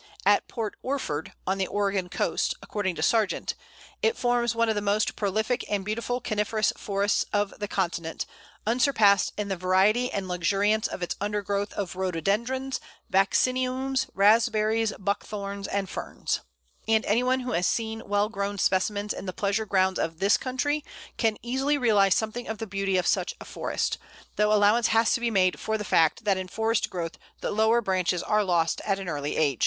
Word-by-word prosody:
At - - +4
Port 225 -4 -4
Orford, 205 - -3
on 190 +1 0
the 190 - 0
Oregon 195 -3 -1
coast, - - 0
according 190 -4 -2
to - - -3
Sargent, 220 -4 +1 0.5
"it 450 +1 +2
forms 240 -2 +1
one 230 0 +2
of 220 - +2
the 205 - -2
most 205 +1 +1
prolific 220 +4 0
and 200 -2 -1
beautiful 235 +4 -2
coniferous 215 -2 0
forests 200 0 0
of 205 -1 0
the 205 - -3
continent, 170 -4 -2 0.4
unsurpassed 220 -4 +4
in 210 -1 -2
the 195 - 0
variety 190 +7 +2
and 195 -2 -3
luxuriance 200 +4 +1
of 180 - -5
its 175 - -2
undergrowth 205 0 -1
of 195 -3 -4
Rhododendrons, 210 +9 -1 0.3
Vacciniums, 255 +6 +1
Raspberries, 220 +1 +3
Buckthorns, 200 0 -3
and 200 -1 -1
Ferns," - - -3 0.5
and 220 0 +3
any 215 +4 +2
one 255 +1 +1
who 250 0 -4
has 175 +1 +1
seen 225 -1 -1
well 205 +1 +2
grown 200 -2 -3
specimens 205 +2 +1
in 195 - -7
the 185 - -3
pleasure 205 +3 -1
grounds 190 -1 +2
of 160 0 -2
this 195 +4 +4
country 285 +4 -1 0.3
can 225 -2 +1
easily 265 +4 +1
realize 205 -7 +4
something 220 +2 -2
of 220 - -4
the 225 - -4
beauty 195 -2 -1
of 180 - +1
such - - +1
a - - -9
forest, - - -2 0.4
though 210 0 +2
allowance 210 +2 +4
has 225 0 +3
to - - +1
be 235 0 0
made 185 -4 +2
for 220 0 -1
the 210 - -5
fact 165 +2 +3
that 200 -3 +2
in 185 0 -4
forest 220 +3 0
growth 170 -2 -5 0.2
the - - -2
lower 220 +2 +3
branches 185 -3 0
are 215 0 +2
lost 170 -4 +1
at 195 -2 0
an 195 -1 -6
early 145 -3 -3
age. 140 -6 +1
205 Hz, 180 wpm, -27 LUFS, 190-225 Hz, 0.5 s, At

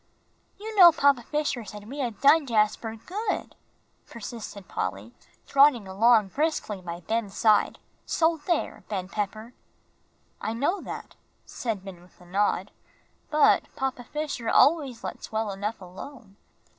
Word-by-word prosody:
"You 435 +2 -7
know 350 -2 +11
Papa 280 -5 +3
Fisher 285 -1 -2
said 210 0 -10
we 280 +5 -7
had 240 -6 -3
done 285 +1 +5
Jasper 220 0 +1
good," 395 - -4 0.5
persisted 210 -3 -8
Polly, 100 +5 -4 0.3
trotting 275 -7 +4
along 215 +2 +4
briskly 280 - -1
by 175 -1 -7
Ben's 215 +1 -2
side, 215 -2 +3 0.3
"so 325 0 +1
there, 345 -3 -1
Ben 190 -3 -3
Pepper." 215 +4 -4 0.9
"I 220 - -2
know 290 - 0
that," - - -8 0.3
said 215 -5 -4
Ben, 185 -3 -9
with 180 - -22
a 180 - -16
nod. 195 +1 0 0.6
"But 305 -1 +4
Papa 265 -2 -3
Fisher 290 -5 -4
always 280 -6 +3
lets - - -7
well 220 -1 -1
enough 205 +3 -4
alone. 195 +4 -11
225 Hz, 135 wpm, -26 LUFS, 200-285 Hz, 0.9 s, know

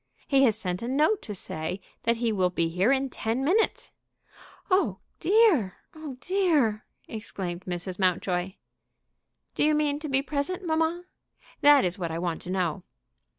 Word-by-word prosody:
"He 275 -1 +4
has 220 -4 +2
sent 180 -3 -3
a 235 - -4
note 305 - +2
to 210 - -7
say 160 +1 -5 0.3
that 230 0 +2
he 230 -1 0
will 185 -4 +2
be 170 -2 0
here 185 +8 +2
in 270 -1 +1
ten 235 +5 -2
minutes." 420 +8 +1 0.8
"Oh 370 +2 +2 0.2
dear! 370 - +4 0.2
oh 305 -5 -8
dear!" 315 - +1 0.2
exclaimed 190 -5 -5
Mrs. 180 +1 -4
Mountjoy. 185 0 0 1.0
"Do - - 0
you 305 0 +4
mean 295 -1 +1
to 305 -1 -6
be 270 0 +2
present, 305 +7 -3
mamma? 325 +2 0 0.6
That 290 -4 +7
is 180 +2 -2
what 170 -2 -2
I 165 - -3
want 170 -1 -2
to 180 - -7
know." 180 -2 -1
230 Hz, 160 wpm, -27 LUFS, 180-300 Hz, 1.0 s, That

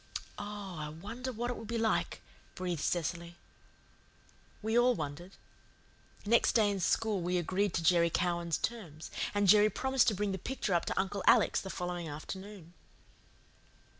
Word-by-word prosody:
"Oh, 205 -3 -6
I 150 0 -4
wonder 210 +11 -6
what 240 +1 -3
it - - -5
will - - -8
be 230 +2 -3
like," 225 -1 0 0.3
breathed 180 -4 -3
Cecily. 170 0 -2 1.3
We 220 +1 0
all 245 +1 +5
wondered. 155 +4 -6 0.9
Next 235 +3 +4
day 215 -3 +4
in 200 - -2
school 205 +2 +1
we 180 +1 0
agreed 185 +2 0
to 170 - 0
Jerry 170 0 +4
Cowan's 170 -1 0
terms, 170 -10 -5 0.2
and 205 -1 +2
Jerry 210 +2 +7
promised 265 +2 +1
to 215 - +3
bring 205 +1 -1
the 190 - -3
picture 230 -2 -2
up 170 - +2
to - - -1
Uncle 195 0 -2
Alec's - - +5
the 190 - -7
following 175 -3 -4
afternoon. 185 +3 -8
190 Hz, 160 wpm, -32 LUFS, 170-215 Hz, 1.3 s, Jerry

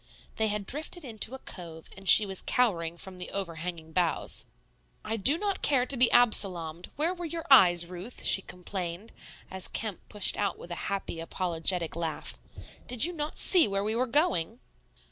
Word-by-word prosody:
They 220 - +1
had 210 -1 -3
drifted 310 - -1
into 230 +1 -3
a 265 - -14
cove, 165 -3 -11
and 195 -1 -4
she 210 - +8
was 190 -1 -2
cowering 170 -9 0
from 185 0 -10
the 180 - -6
over 185 -5 -4
hanging 160 -1 -6
boughs. 175 0 -1 0.6
"I 220 - -2
do 245 - +2
not 400 0 -3
care 260 -4 +2
to 275 - -2
be 245 -1 +3
Absalomed; 180 -8 +2
where 320 +5 -1
were 350 -1 -7
your 330 0 -6
eyes, 175 -9 +7
Ruth?" 180 +7 -6
she 195 - +7
complained, 180 +2 -6 0.4
as 190 0 0
Kemp 215 -5 -3
pushed 205 -2 +2
out 200 - -1
with 175 - -12
a 175 - -5
happy, 195 -4 -4
apologetic 170 0 0
laugh. 165 -2 -4 0.5
"Did 250 +2 +4
not 300 -2 -5
you - - -7
see 355 - +6
where 195 0 -2
we 215 +1 -2
were 255 +2 0
going?" 230 - 0
195 Hz, 185 wpm, -28 LUFS, 175-250 Hz, 0.6 s, she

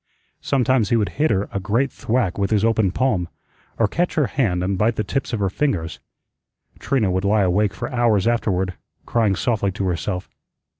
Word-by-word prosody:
Sometimes 130 -5 +1
he - - +3
would 105 -3 +1
hit 155 - +4
her 100 -1 0
a 100 - -2
great 115 +8 0
thwack 115 -6 -1
with 100 -1 +1
his 110 0 +2
open 110 -3 +2
palm, 100 -8 0 0.5
or 115 - +3
catch 175 - -1
her 150 - +3
hand 100 -11 0
and 95 +2 0
bite 110 +4 +1
the 105 - -1
tips 135 +7 -3
of 115 - -2
her 100 - +1
fingers. 95 - -1 0.8
Trina 120 -9 +1
would 95 +1 -1
lie 100 +1 +3
awake 100 +2 +1
for - - -4
hours 115 -5 +2
afterward, 95 -6 0 0.3
crying 110 -4 +1
softly 100 -1 0
to 100 0 -3
herself. 90 +1 -2
105 Hz, 190 wpm, -21 LUFS, 95-120 Hz, 0.8 s, hit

